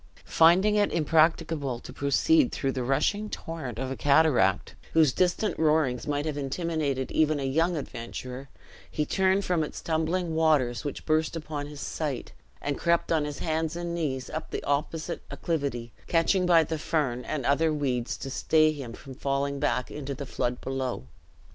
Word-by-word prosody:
Finding 180 +6 +5
it 205 - +2
impracticable 155 -4 +2
to 125 - -11
proceed 245 - +3
through 135 - -1
the 130 - -3
rushing 155 - 0
torrent 155 - -6
of 130 +1 -3
a - - -2
cataract, 140 - +3 0.2
whose 155 -5 +5
distant 185 +5 0
roarings 150 -5 +2
might 145 0 -1
have 150 -2 -2
intimidated 140 -2 -2
even 155 -1 +2
a - - -3
younger 165 +6 +1
adventurer, 130 0 -7 0.4
he 150 - -1
turned 190 +3 +2
from 175 -3 +1
its - - -6
tumbling 165 +2 -1
waters 150 -8 +2
which 145 - -5
burst 155 +1 +1
upon 150 -2 -5
his 145 -1 -9
sight, 145 -6 -4 0.3
and 145 -1 -2
crept 170 0 +1
on 155 -2 +2
his 145 -1 -5
hands 160 0 -1
and 175 0 -3
knees 140 -6 -2
up - - -5
the - - -4
opposite 155 +4 -2
acclivity, 140 -8 -3
catching 180 +2 +2
by 170 -2 +6
the 160 0 -4
fern 135 -6 -1
and 140 -5 -3
other 155 +3 +3
weeds 130 -5 -1
to 135 - -6
stay 155 +3 +3
him 135 -6 -7
from 135 +2 -10
falling 140 +1 -1
back 125 -2 0
into 140 -2 -5
the 140 +1 -6
flood 125 -1 -2
below. 130 - -3
150 Hz, 170 wpm, -27 LUFS, 135-165 Hz, 0.4 s, by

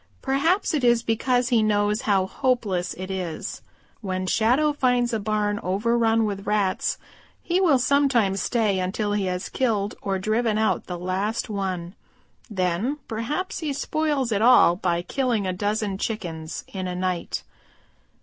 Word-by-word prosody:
Perhaps 315 +10 +1
it 290 -4 0
is 240 -1 +4
because 245 +2 +1
he 235 -3 +4
knows 210 +1 +1
how 195 -2 +3
hopeless 205 -7 -1
it 185 +1 -6
is. 180 -4 -4 0.4
When 185 -3 -2
Shadow 250 +10 +2
finds 245 -3 +1
a 225 - +1
barn 210 0 0
overrun 225 +4 +2
with 200 -1 -4
Rats 205 -3 +1 0.5
he 360 +2 +1
will 320 -8 +5
sometimes 245 -8 +2
stay 215 -5 +1
until 205 +3 -1
he 205 -2 0
has 180 0 -2
killed 215 -5 0
or 195 -1 -1
driven 215 +3 0
out 220 0 0
the 180 - -4
last 195 +6 -2
one. 185 -3 -3 0.6
Then 190 +7 -1
perhaps 255 +12 -3
he 310 -4 -2
spoils 295 -3 -1
it 205 -1 +1
all 240 -7 +6
by 175 -2 -1
killing 245 -3 0
a 185 - -1
dozen 205 0 -1
Chickens 170 -9 -4
in 185 -2 -4
a 180 - -3
night. 180 -1 -2
215 Hz, 150 wpm, -24 LUFS, 190-245 Hz, 0.6 s, all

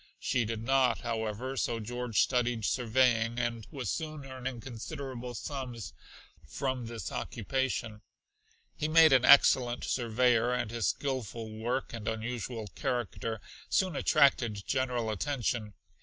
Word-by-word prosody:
She 120 -2 0
did 110 0 -4
not, 135 0 +3
however, 115 +2 -3
so 120 -2 -1
George 120 -1 -1
studied 125 -3 +1
surveying; 120 -1 +2
and 120 -2 -2
was 130 -7 -3
soon 155 -3 -4
earning 130 -2 -5
considerable 125 0 -6
sums 125 - -5 0.5
from 130 -3 -3
this 115 -1 -5
occupation. 115 -2 -2 0.7
He 155 - -1
made 160 -1 +7
an 130 -2 +5
excellent 125 -3 +6
surveyor, 120 0 +2
and 120 -3 -2
his 115 -3 0
skilful 120 -5 -3
work 120 +4 -2
and 115 -2 -6
unusual 115 0 -3
character 115 -2 -3 0.3
soon 185 -4 +1
attracted 120 -8 +3
general 125 -4 0
attention. 115 -3 -2
120 Hz, 125 wpm, -31 LUFS, 115-130 Hz, 0.7 s, made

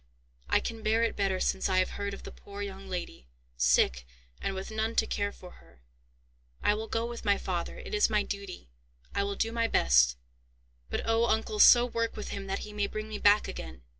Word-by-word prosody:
"I - - +4
can 225 -1 -5
bear 220 +2 +2
it 230 - 0
better 195 -2 0
since 190 - 0
I 185 - +2
have 185 - +2
heard 200 0 -4
of - - -13
the - - -8
poor 200 0 -8
young 195 -1 -7
lady, 175 - -6 0.3
sick - - +2 0.3
and 195 - -2
with 190 +3 -6
none 220 +1 -2
to - - +3
care 205 0 -2
for 180 -2 -13
her. 60 - -23 0.8
I - - +4
will 220 +1 -4
go 225 +1 -1
with 235 0 -6
my 200 -2 +3
father; 175 -2 -3
it - - -9
is 210 +1 +3
my 210 -1 +2
duty. 200 - -7 0.4
I 200 - +1
will 200 0 -2
do 225 +3 -1
my 230 0 +1
best; - - +4 0.7
but - - -2
oh! 225 +1 +3
uncle, 220 -1 0
so 240 +2 +8
work 230 -1 -2
with 210 - -5
him 195 -1 -5
that 195 - -3
he 210 - -10
may 205 -1 0
bring 215 +1 -5
me 215 -1 -5
back 205 +1 +5
again." 65 -1 -8
205 Hz, 220 wpm, -29 LUFS, 185-220 Hz, 0.8 s, so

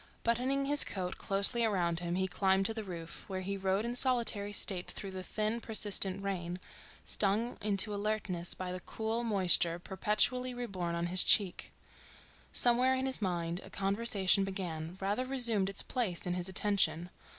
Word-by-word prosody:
Buttoning 255 +4 0
his 290 +1 +7
coat 185 -2 -5
closely 200 +4 +1
around 175 -6 0
him 175 0 -3
he 190 +1 -1
climbed 190 +1 +1
to 225 - -1
the 220 -1 -6
roof, 170 -4 -7
where 190 -1 -4
he 200 +2 -4
rode 195 +2 -1
in 240 +1 -4
solitary 235 -5 +2
state 190 -3 +1
through 195 - -7
the 190 0 -6
thin, 215 +4 -3
persistent 200 -3 +2
rain, 180 -3 -4 0.5
stung 215 +4 +1
into 205 0 +1
alertness 205 -4 -1
by 185 -1 -6
the 180 - -5
cool 220 +5 -4
moisture 185 -6 +3
perpetually 215 +7 -1
reborn 185 -8 -4
on 170 0 -2
his 180 +1 +5
cheek. 195 -4 +3 0.8
Somewhere 250 +2 +3
in 260 0 -2
his 265 -3 +1
mind 175 -2 -3
a - - -12
conversation 195 -1 +2
began, 180 -3 -5
rather 200 +6 -2
resumed 235 -7 +1
its 195 - -1
place 215 -9 -2
in 180 - -2
his 180 +1 -2
attention. 180 -3 0
195 Hz, 165 wpm, -31 LUFS, 180-225 Hz, 0.8 s, his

